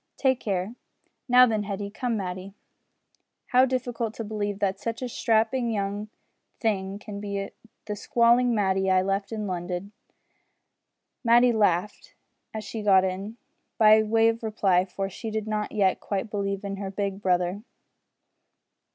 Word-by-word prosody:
Take 260 -2 +2
care! 195 +1 -2 0.6
Now 250 0 +8
then, 220 -3 0
Hetty 200 0 -4
come, 235 +1 -2
Matty. 185 0 -5 0.9
How 255 0 +5
difficult 245 -3 -2
to 225 - -4
believe 205 -2 -3
that 195 -1 -1
such 230 +3 -4
a - - -2
strapping 230 +1 +1
young 205 0 -2 0.5
thing 195 -4 -1
can 205 -1 -8
be 200 -1 -4 0.3
the 210 - -4
squalling 240 +2 +3
Matty 190 -2 +1
I 185 0 +4
left 195 +1 -2
in 215 -2 -3
London!" 180 +1 -4 1.3
Matty 240 +1 +5
laughed 205 -3 0 0.4
as 220 -1 -5
she 220 - -6
got 195 -2 +5
in, 195 +4 -4 0.4
by 215 0 +7
way 225 +1 +3
of 230 0 0
reply, 195 -5 +2
for 195 +1 -4
she 220 +4 -7
did 215 -1 -3
not 215 -1 -2
yet 195 -3 +2
quite 205 +2 -3
believe 200 -1 -2
in 200 0 -4
her 195 -1 -4
big 195 0 -3
brother. 180 +1 0
205 Hz, 150 wpm, -26 LUFS, 195-225 Hz, 1.3 s, Now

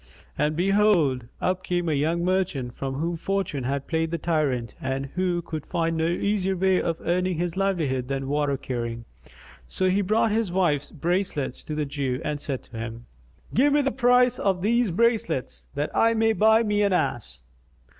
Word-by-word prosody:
And 150 +1 0
behold, 175 - +2
up 185 0 0
came 175 -1 -1
a 160 - +1
young 165 +4 0
merchant 180 -9 0
with 135 -1 -2
whom 165 +4 -1
fortune 180 -7 -2
had 140 +1 -2
played 160 -1 -1
the 170 - -2
tyrant 145 -8 -1
and 135 +1 -2
who 180 -1 0
could 155 -3 -5
find 165 -2 0
no 160 0 +1
easier 190 +2 0
way 190 0 +3
of 165 -1 -1
earning 180 0 0
his 175 0 -2
livelihood 160 -10 0
than 135 0 -3
water 145 -1 0
carrying. 120 -2 -4 0.6
So 185 - 0
he 200 +2 +2
brought 215 +3 +2
his 220 -3 0
wife's 150 -6 +1
bracelets 170 -4 -2
to 155 - -4
the 150 -1 -1
Jew 135 -3 -2
and 145 -1 -2
said 135 -3 -4
to 115 - -11
him, 115 +1 -6 0.5
"Give 280 +4 +4
me 290 0 +3
the 275 - +1
price 250 -1 +3
of 190 -2 0
these 235 +1 +2
bracelets, 200 - 0
that 145 +1 -2
I 230 0 +4
may 225 0 +3
buy 220 +1 +4
me 210 -1 +1
an 200 -2 +2
ass." 120 - -1
170 Hz, 185 wpm, -25 LUFS, 140-195 Hz, 0.6 s, Give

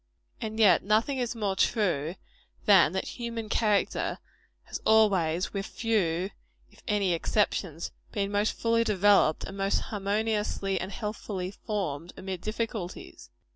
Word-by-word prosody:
And 220 0 -4
yet 210 -4 +6
nothing 225 +7 +1
is 240 -1 -2
more 205 -4 -1
true, 175 - +1 0.5
than 195 -6 +6
that 190 - -2
human 230 -2 -4
character 210 -3 +1 0.5
has - - -7
always, 190 -6 +3
with 195 -1 -3
few 190 -5 0 0.4
if - - -20
any 205 -5 +2
exceptions, 170 -2 -1 0.2
been 200 -1 -1
most 205 +1 +1
fully 230 0 +2
developed 205 -6 +4
and 195 - -7
most 195 0 +1
harmoniously 210 -1 -1
and 190 - -5
healthfully 205 -4 -4
formed, 180 -6 -4
amid 190 -2 -5
difficulties. 215 -3 -5
205 Hz, 130 wpm, -28 LUFS, 185-220 Hz, 0.5 s, yet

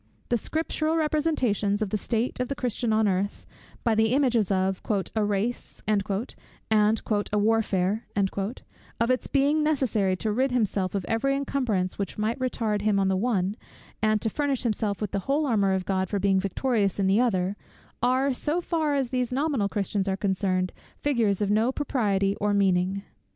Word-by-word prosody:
The 240 - +3
scriptural 315 +4 -1
representations 290 -10 +1
of 200 - -4
the - - +1
state 230 +4 -2
of 250 - 0
the 275 - -3
Christian 240 -2 -1
on 215 0 +3
earth, 195 +1 -1 0.4
by 230 - +2
the 220 +2 +3
images 245 -8 +2
of 190 -1 0 0.3
"a 220 - +2
race," 205 +4 -2
and 210 -2 +3
"a 210 0 -1
warfare;" 210 -1 +1 0.9
of 235 +2 +2
its 255 - 0
being 285 +2 +2
necessary 250 -11 +1
to 215 +4 -2
rid 260 +5 +1
himself 205 -6 0
of 195 -3 -2
every 275 +5 +1
encumbrance 245 -10 -1
which 200 - -3
might 220 +4 -1
retard 225 -5 -1
him 210 -1 +2
in 195 -1 +2
the 190 - +2
one, 200 -2 0 0.5
and 215 -1 +2
to 225 - +1
furnish 285 -1 0
himself 215 -3 -1
with 210 - -2
the 200 - -1
whole 295 +2 +2
armour 200 -7 +2
of 190 -1 -1
God 190 -1 0
for 205 - -1
being 195 -1 +2
victorious 200 +1 0
in 200 - +1
the 195 +3 +3
other, 195 -5 +1 0.5
are, 260 +3 +2
so 300 +6 -1
far 320 -4 0
as 270 -3 0
these 250 -1 -1
nominal 265 -6 0
Christians 200 -1 -1
are 190 0 0
concerned, 185 -2 0 0.2
figures 225 -8 +1
of 200 - 0
no 220 +4 +3
propriety 205 -9 0
or 205 0 +1
meaning. 190 0 +1
215 Hz, 175 wpm, -26 LUFS, 195-255 Hz, 0.9 s, The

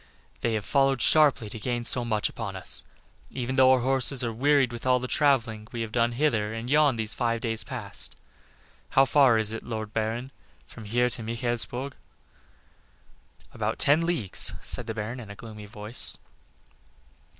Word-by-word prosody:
"They 115 - -1
have 105 -2 -3
followed 135 -2 +2
sharply 145 -5 +4
to 110 - -7
gain 120 +1 -2
so 125 +1 +1
much 110 -3 0
upon 100 -4 -6
us, 95 - +2 0.5
even 130 0 -4
though 130 -1 +6
our 130 -1 +4
horses 130 0 +2
are 115 -1 -2
wearied 135 +1 +2
with 120 - -7
all 130 -1 +3
the 125 - -4
travelling 120 -7 +1
we 120 -3 -4
have 115 -1 -4
done 120 0 +1
hither 115 -6 0
and 115 +3 -5
yon 150 -3 +4
these 110 -1 -4
five 115 -1 -1
days 110 -1 -1
past. 110 -5 -5 0.7
How 135 - +5
far 135 -4 +5
is 110 -1 +2
it, 115 - -4
Lord 110 -2 -6
Baron, 115 +4 -2 0.3
from 115 - -12
here 120 +4 +1
to 120 - -7
Michaelsburg?" 120 +3 -2 1.6
"About - - -2
ten 145 +4 +3
leagues," 165 - +1
said 120 - -4
the 110 - -4
Baron, 115 +3 -4
in 110 -4 -10
a 100 - -8
gloomy 105 -2 -10
voice. 105 +3 -2
120 Hz, 170 wpm, -26 LUFS, 110-130 Hz, 1.6 s, though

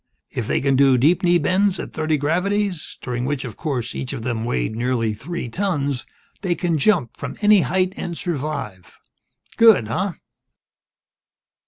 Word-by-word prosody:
If - - -3
they - - +1
can 135 0 +2
do 135 -1 +5
deep 165 +8 +3
knee 175 -2 +4
bends 185 +4 +1
at - - -6
thirty 155 -1 0
gravities 180 +4 -1
during 125 -1 -3
which, 135 +1 -2
of 115 - -7
course, 130 -7 -3
each 130 +1 -4
of 120 -5 -5
them 115 -2 -2
weighed 65 - -1
nearly 115 -2 0
three 140 +7 -5
tons 145 - -2 0.3
they 180 -3 0
can 170 -2 0
jump 155 - +2
from - - -6
any 210 -2 +6
height 185 +1 0
and 170 -1 -4
survive. 140 - -4 0.6
Good, 220 - +6
huh?" 185 - -1
150 Hz, 160 wpm, -21 LUFS, 125-180 Hz, 0.6 s, any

